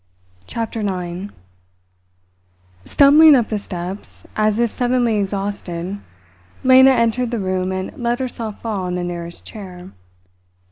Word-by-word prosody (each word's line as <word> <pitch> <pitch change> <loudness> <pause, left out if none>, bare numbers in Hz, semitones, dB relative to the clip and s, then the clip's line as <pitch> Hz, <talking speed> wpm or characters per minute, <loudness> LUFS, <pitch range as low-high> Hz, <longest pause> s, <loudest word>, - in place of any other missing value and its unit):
CHAPTER 225 -1 -4
NINE 185 -1 -4 1.5
Stumbling 295 +2 +7
up 240 -4 +1
the 215 - -1
steps, 185 0 -8
as 215 0 +1
if 235 -1 +1
suddenly 245 -3 +1
exhausted, 195 -2 -3 0.6
Lena 260 0 +7
entered 240 -1 +2
the 240 - -2
room 185 -2 -1
and 185 0 -4
let 240 0 0
herself 235 -4 -5
fall 210 -5 -2
on 180 0 -3
the 180 - -2
nearest 170 -1 -6
chair. 185 -4 -10
205 Hz, 125 wpm, -19 LUFS, 185-240 Hz, 1.5 s, Stumbling